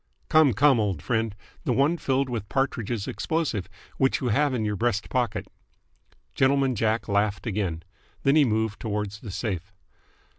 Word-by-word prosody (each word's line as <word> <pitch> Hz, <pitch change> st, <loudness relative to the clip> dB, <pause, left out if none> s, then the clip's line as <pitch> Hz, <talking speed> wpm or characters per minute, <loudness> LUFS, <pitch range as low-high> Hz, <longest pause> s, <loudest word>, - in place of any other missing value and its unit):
"Come, 155 Hz, -5 st, +5 dB
come, 135 Hz, +3 st, +4 dB
old 100 Hz, -7 st, 0 dB
friend! 115 Hz, -3 st, 0 dB, 0.3 s
The 125 Hz, -, +1 dB
one 140 Hz, +7 st, +3 dB
filled 135 Hz, -4 st, 0 dB
with 115 Hz, -5 st, -4 dB
Partridge's 120 Hz, -6 st, -1 dB
explosive, 110 Hz, -, -2 dB, 0.3 s
which 135 Hz, 0 st, +2 dB
you 125 Hz, -, -1 dB
have 145 Hz, +6 st, +2 dB
in 120 Hz, -4 st, -1 dB
your 105 Hz, -1 st, -1 dB
breast 110 Hz, -1 st, -1 dB
pocket." 125 Hz, -4 st, 0 dB, 0.9 s
Gentleman 135 Hz, 0 st, +3 dB
Jack 110 Hz, 0 st, 0 dB
laughed 100 Hz, 0 st, 0 dB
again. 95 Hz, -7 st, -2 dB, 0.4 s
Then 135 Hz, +1 st, +4 dB
he 155 Hz, -, +6 dB
moved 110 Hz, -3 st, 0 dB
towards 105 Hz, -2 st, -3 dB
the 110 Hz, -, -9 dB
safe. 95 Hz, -2 st, -4 dB
115 Hz, 155 wpm, -26 LUFS, 105-135 Hz, 0.9 s, he